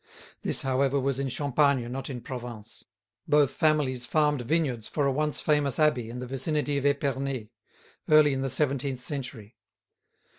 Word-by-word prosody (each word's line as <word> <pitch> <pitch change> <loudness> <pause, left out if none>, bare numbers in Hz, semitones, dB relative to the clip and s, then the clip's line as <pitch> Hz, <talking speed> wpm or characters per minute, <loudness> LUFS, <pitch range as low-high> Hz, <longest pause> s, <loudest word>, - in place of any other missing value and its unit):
This, - - +1
however, 135 +1 +1
was 135 0 -1
in 135 -1 -1
Champagne, 140 -2 +1
not 135 +2 -5
in 125 -3 -5
Provence. 120 -4 -8 0.4
Both 145 -2 +3
families 140 -5 +1
farmed 150 -3 +2
vineyards 130 -4 -1
for 145 - -1
a 140 - +2
once 150 +2 0
famous 150 -4 +1
abbey 140 -7 +2
in 120 - -7
the 125 - -5
vicinity 140 +2 -1
of 140 - +1
Epernay, 135 -5 -1 0.6
early 155 -2 +6
in 135 - -2
the 135 - -1
seventeenth 135 -1 -1
century. 125 -5 -6
135 Hz, 155 wpm, -27 LUFS, 125-145 Hz, 0.6 s, early